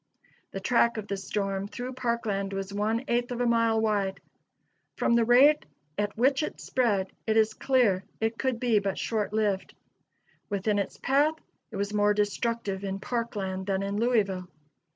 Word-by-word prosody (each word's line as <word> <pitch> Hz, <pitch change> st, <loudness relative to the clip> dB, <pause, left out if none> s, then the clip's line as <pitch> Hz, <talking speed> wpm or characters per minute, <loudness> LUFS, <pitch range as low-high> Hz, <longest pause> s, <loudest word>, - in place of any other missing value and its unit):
The 195 Hz, -, -5 dB
track 235 Hz, +2 st, +2 dB
of 210 Hz, -1 st, -5 dB
the 200 Hz, -, -2 dB
storm 195 Hz, 0 st, -2 dB
through 250 Hz, +4 st, -6 dB
Parkland 225 Hz, -6 st, -2 dB
was 195 Hz, 0 st, -4 dB
one 215 Hz, +4 st, 0 dB
eighth 240 Hz, -1 st, 0 dB
of 245 Hz, -1 st, -4 dB
a 245 Hz, -, +1 dB
mile 230 Hz, -1 st, +3 dB
wide. 205 Hz, -3 st, 0 dB, 0.8 s
From -, -, +2 dB
the 235 Hz, 0 st, +4 dB
rate 270 Hz, +6 st, +6 dB, 0.3 s
at 205 Hz, 0 st, -2 dB
which 270 Hz, +4 st, +3 dB
it 305 Hz, -, -4 dB
spread, 205 Hz, -7 st, 0 dB, 0.2 s
it 220 Hz, 0 st, +2 dB
is 220 Hz, 0 st, +3 dB
clear 225 Hz, -8 st, +2 dB, 0.2 s
it 225 Hz, +1 st, -1 dB
could 260 Hz, -3 st, 0 dB
be 235 Hz, -4 st, +3 dB
but 195 Hz, -1 st, -2 dB
short 215 Hz, -3 st, -1 dB
lived. 210 Hz, -3 st, -1 dB, 0.7 s
Within 205 Hz, 0 st, 0 dB
its 200 Hz, -, -3 dB
path, 285 Hz, +4 st, +2 dB, 0.3 s
it -, -, -9 dB
was 200 Hz, +1 st, -2 dB
more 210 Hz, 0 st, +3 dB
destructive 205 Hz, -1 st, -1 dB
in 195 Hz, 0 st, -3 dB
Parkland 200 Hz, -5 st, -3 dB
than 195 Hz, 0 st, 0 dB
in 200 Hz, 0 st, -2 dB
Louisville. 205 Hz, -6 st, +1 dB
215 Hz, 170 wpm, -28 LUFS, 200-235 Hz, 0.8 s, rate